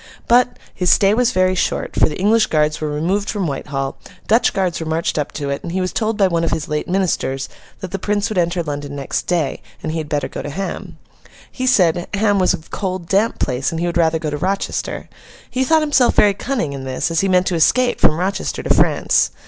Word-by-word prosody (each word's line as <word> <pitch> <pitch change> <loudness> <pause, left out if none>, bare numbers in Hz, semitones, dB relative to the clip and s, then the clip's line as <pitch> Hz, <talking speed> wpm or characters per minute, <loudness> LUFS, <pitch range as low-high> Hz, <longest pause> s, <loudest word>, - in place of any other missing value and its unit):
But, 245 +1 +3 0.2
his 180 -1 0
stay 200 0 +5
was 245 +1 +2
very 185 0 +2
short, 185 - -1
for - - +4
the 150 - -6
English 215 +3 +3
guards 155 0 +1
were 155 - -1
removed 175 +8 -1
from 200 -3 -1
Whitehall, 135 -2 -3 0.3
Dutch 225 +3 +3
guards 185 -3 -1
were 160 - -5
marched 160 0 -1
up 145 - -2
to 140 -2 -3
it, 140 - -3
and 170 - -6
he 190 - 0
was 185 0 -2
told 220 -1 -1
by 195 -3 +4
one 170 -2 0
of 165 - +1
his 155 - -2
late 150 0 -2
ministers 175 -8 -1 0.3
that 185 - -6
the 195 - -3
Prince 205 +1 0
would 215 -5 -1
enter 170 0 0
London, 145 -2 -5
next 140 -1 -3
day, 165 -6 -1 0.2
and 155 - -2
he 160 - -2
had 155 -2 -6
better 145 -3 -1
go - - -6
to - - -6
Ham. 190 +7 -5 0.5
He 255 0 -3
said, 175 -7 +3
Ham 205 -1 +2
was 185 - +3
a 160 - -14
cold, 185 -3 -3
damp 200 +5 +1
place, 130 0 -1
and 165 - -4
he 170 - -1
would 175 0 -2
rather 165 -1 +3
go 155 -2 -4
to 145 - -2
Rochester. 190 +6 -2 0.4
He 260 - 0
thought 320 +4 +3
himself 285 -5 +3
very 205 -1 +5
cunning 210 - -2
in 135 -1 -6
this, 130 +5 -2
as 165 - +1
he 195 - +1
meant 180 0 +3
to 180 - 0
escape 245 +10 +3
from 155 - +4
Rochester 190 +2 -2
to - - +3
France. - - +3
180 Hz, 235 wpm, -19 LUFS, 155-200 Hz, 0.5 s, stay